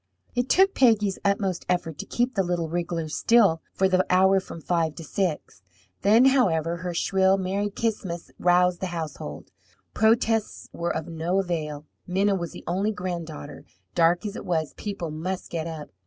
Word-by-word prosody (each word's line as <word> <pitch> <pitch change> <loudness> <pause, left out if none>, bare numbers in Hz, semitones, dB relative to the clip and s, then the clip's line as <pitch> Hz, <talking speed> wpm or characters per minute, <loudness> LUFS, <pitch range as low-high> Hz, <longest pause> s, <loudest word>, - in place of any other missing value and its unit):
It 245 +1 -1
took 385 +1 +5
Peggy's 215 -6 +3
utmost 200 -2 0
effort 165 -4 -1
to - - -6
keep 245 +2 0
the 195 - +1
little 175 -2 -1
wriggler 170 -1 -2
still 195 0 +3
for 190 - +2
the 185 0 +3
hour 190 +1 +5
from 185 - -9
five 165 -2 0
to 165 - -8
six. 160 - -3 0.4
Then, 220 +5 +5
however, 170 - +3
her 175 0 -5
shrill, 190 +2 +3
"Merry 195 +2 -1
Ch'is'mus!" 205 -6 -3
roused 180 0 +3
the 190 - -2
household. 155 - -6 0.4
Protests 225 0 +1
were 170 0 -2
of 160 -1 -3
no 170 +3 -1
avail. 155 -5 -4 0.2
Minna 195 +3 +2
was 175 -4 -3
the - - -10
only 195 +5 0
granddaughter. 175 - -6 0.3
Dark 170 +4 +3
as 205 0 -4
it - - -6
was, 160 -4 -1
people 195 -6 -5
must 180 +5 -4
get 165 -1 -3
up. 160 -3 -7
180 Hz, 170 wpm, -25 LUFS, 165-200 Hz, 0.4 s, took